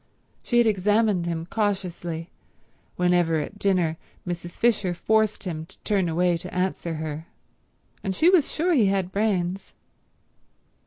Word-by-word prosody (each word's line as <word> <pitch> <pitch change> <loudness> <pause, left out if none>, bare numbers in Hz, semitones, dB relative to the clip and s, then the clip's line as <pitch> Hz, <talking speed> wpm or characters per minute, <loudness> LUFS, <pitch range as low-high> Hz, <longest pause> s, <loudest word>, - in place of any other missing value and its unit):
She 240 - 0
had 240 - +6
examined 205 -2 +2
him 165 -1 -2
cautiously 180 -5 -2 0.6
whenever 175 -2 +2
at 155 +7 -5
dinner 180 -5 +1 0.3
Mrs. 175 0 -4
Fisher 210 -6 +2
forced 215 +3 +1
him 160 -4 -4
to - - -17
turn 195 -4 +1
away 175 +1 +2
to 165 - -8
answer 180 -2 -2
her, 155 +1 -5 0.8
and 190 -2 -2
she 320 - +3
was 360 -5 +4
sure 345 +3 +1
he 235 -10 +4
had 195 -2 0
brains. 195 -3 -1
185 Hz, 140 wpm, -25 LUFS, 170-210 Hz, 0.8 s, had